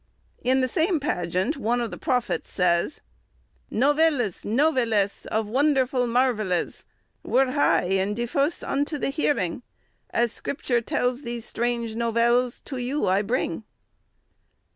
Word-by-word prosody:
In 260 +2 +3
the 255 - +2
same 325 +5 +1
pageant 185 - -1
one 240 -1 0
of 235 -2 -2
the - - -6
prophets 250 -3 -1
says— 170 -2 +1 0.7
"Novellis, 285 - +2
novellis 230 -5 +1
of 220 0 0
wondrfull 260 +1 +2
mrvellys, 230 -8 0 0.4
Were 260 0 +2
'hy 285 +1 +3
and 190 +3 0
defuce 275 +7 -1
vnto 290 +2 -1
the 275 - -1
heryng, 275 - 0 0.5
Asse 235 -1 +1
scripture 250 -4 -1
tellis 245 +2 -1
these 235 -3 -5
strange 235 -1 -2
novellis 235 +2 +1
to 270 - -6
you 255 +4 -1
I 190 +2 +3
bryng." 210 -5 -1
245 Hz, 125 wpm, -25 LUFS, 220-275 Hz, 0.7 s, In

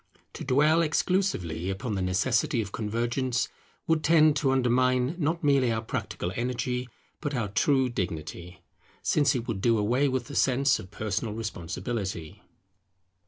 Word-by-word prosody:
To - - -7
dwell 150 +5 +4
exclusively 155 - 0
upon 105 +4 -3
the 95 - -1
necessity 115 - +1
of 100 -3 -3
convergence 120 +3 -1 0.4
would 160 -1 +1
tend 155 -2 +5
to 140 -2 +1
undermine 130 +1 +2
not 160 +2 0
merely 135 -4 +3
our 110 0 -1
practical 90 -4 -4
energy, 125 +1 -2 0.3
but 145 -2 -3
our 115 -5 -1
true 130 +5 +2
dignity; 90 -4 -5 0.4
since 145 -2 +3
it 120 -2 -3
would 105 -5 -3
do 115 +1 +3
away 120 +7 +2
with 130 -2 -1
the 145 - -9
sense 135 0 +3
of 90 - -10
personal 110 +1 -3
responsibility. 95 -3 -4
125 Hz, 145 wpm, -27 LUFS, 105-140 Hz, 0.4 s, tend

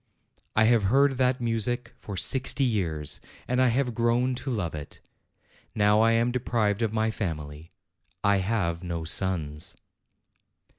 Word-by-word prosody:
I 110 - +4
have 110 -2 +3
heard 135 +5 +3
that 130 0 +2
music 120 +1 -2
for 100 -2 -7
sixty 130 +6 +2
years, 85 - -1 0.3
and 125 +1 +1
I 130 - +4
have 125 +1 0
grown 120 +3 +1
to 130 +2 -5
love 100 -10 -2
it. 75 -2 -8 0.8
Now 105 0 +4
I 115 0 +4
am 115 +1 +2
deprived 115 -4 0
of 110 -2 0
my 110 0 0
family. 80 -6 -6 0.5
I 100 -1 +3
have 95 -4 -1
no 85 -2 -4
sons." 80 -3 0
110 Hz, 145 wpm, -26 LUFS, 90-120 Hz, 0.8 s, I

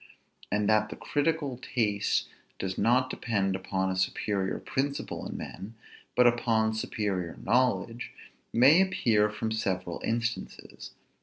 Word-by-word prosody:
And 105 0 +1
that 110 0 +3
the - - -6
critical 145 -3 -1
taste 105 -6 0 0.3
does 95 -1 -3
not 130 +2 +2
depend 100 -5 0
upon 95 0 -1
a - - -2
superior 95 +1 -1
principle 140 0 -3
in - - -6
men, 105 +4 -8 0.4
but 125 - +5
upon 115 -2 +3
superior 100 -5 -2
knowledge, 120 -1 +1 0.4
may 140 +9 +6
appear 115 - +2
from 110 +1 -3
several 95 -5 -2
instances. 120 +1 -3
110 Hz, 125 wpm, -29 LUFS, 100-125 Hz, 0.4 s, may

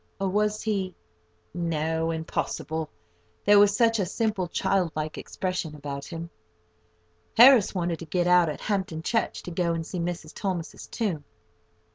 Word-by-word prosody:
or 195 - 0
was 210 +2 0
he—no, 160 - -3
impossible! 160 -1 -3 0.6
there 205 0 +7
was 205 0 +5
such 230 -2 +3
a 195 - +1
simple, 215 -3 -1
child 190 -1 +1
like 155 0 -3
expression 180 -4 -4
about 140 -1 -6
him! 165 0 -7 1.1
Harris 240 -4 +8
wanted 170 -2 -1
to 165 - -7
get 175 +2 0
out 180 -2 +5
at 150 - -5
Hampton 190 -6 -2
Church, 225 +5 -1
to 180 - -7
go 170 0 0
and 165 -1 -3
see 180 - -5
Mrs. 170 -2 -4
Thomas's 185 -5 -4
tomb. 185 -11 -2
175 Hz, 145 wpm, -26 LUFS, 160-195 Hz, 1.1 s, Harris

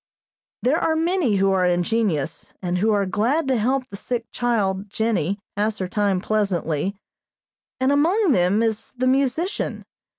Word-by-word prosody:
There 280 +7 +3
are 320 - +1
many 325 - +1
who 195 0 +3
are 185 -1 +2
ingenious, 175 -4 -1
and 180 -1 -2
who 220 +3 +2
are 200 -2 +2
glad 235 - 0
to 260 - +3
help 255 +4 +1
the 200 - -6
sick 235 +2 -3
child, 205 -5 -1
Jennie, 200 -4 0 0.2
pass 210 +1 0
her 185 - -3
time 200 -1 +1
pleasantly, 195 -4 -1 0.8
and 260 +1 +2
among 335 +7 +3
them 190 +2 +3
is 220 -2 -2
the 255 - 0
musician. 275 - 0
215 Hz, 155 wpm, -22 LUFS, 190-260 Hz, 0.8 s, There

